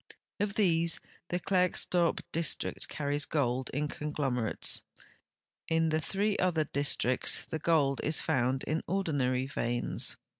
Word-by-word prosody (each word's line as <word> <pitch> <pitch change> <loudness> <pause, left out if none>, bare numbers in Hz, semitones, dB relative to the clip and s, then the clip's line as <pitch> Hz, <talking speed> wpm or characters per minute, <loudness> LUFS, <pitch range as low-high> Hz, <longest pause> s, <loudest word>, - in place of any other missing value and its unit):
Of 205 0 -1
these 170 -5 +3 0.3
the 175 - 0
Klerksdorp 180 -1 +1
district 165 -2 0
carries 145 0 -1
gold 130 -3 0
in 150 +2 -1
conglomerates. 140 -6 -1 0.9
In 165 0 +2
the 155 0 +1
three 200 +4 0
other 175 -4 +2
districts 140 -3 +1
the 160 - -2
gold 145 -4 +2
is 155 +1 +2
found 130 +1 +1
in 155 +2 -1
ordinary 140 -9 0
veins. 120 -3 -1
155 Hz, 120 wpm, -31 LUFS, 135-170 Hz, 0.9 s, these